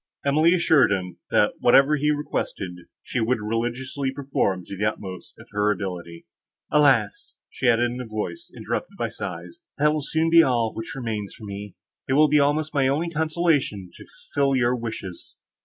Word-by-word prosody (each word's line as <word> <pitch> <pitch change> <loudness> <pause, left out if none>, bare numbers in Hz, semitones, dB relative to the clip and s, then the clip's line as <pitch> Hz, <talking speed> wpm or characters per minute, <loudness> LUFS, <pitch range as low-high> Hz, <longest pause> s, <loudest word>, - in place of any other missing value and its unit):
Emily 155 +5 +4
assured 160 - +4
him, 90 -3 -3
that, 105 - +3
whatever 135 +4 +5
he 150 +1 0
requested 145 -10 -2 0.3
she 125 - -3
would 120 +3 +1
religiously 120 +5 -2
perform 130 -10 -1
to 100 - -7
the 100 - -4
utmost 95 -4 -5
of - - -14
her 105 0 +2
ability. 90 -4 -5 0.5
"Alas!" 135 -9 +2 0.3
added 120 -2 +4
she, - - +4
in 125 - -5
a 125 - -7
voice 110 - -5
interrupted - - -4
by - - -2
sighs, 340 +3 -7 0.2
"that 150 +1 +3
will 155 - -1
soon 160 +3 0
be 165 0 +8
all 120 -6 +1
which 115 +7 -6
remains 110 -6 -4
for 115 - -14
me; 100 0 -7 0.3
it - - +2
will 150 +2 +5
be 150 +1 +4
almost 150 +2 +1
my 140 -2 +2
only 155 +5 0
consolation 155 - 0
to - - -14
fulfil 140 -1 -1
your 125 -1 +2
wishes." 110 -6 -7
130 Hz, 175 wpm, -24 LUFS, 105-150 Hz, 0.5 s, be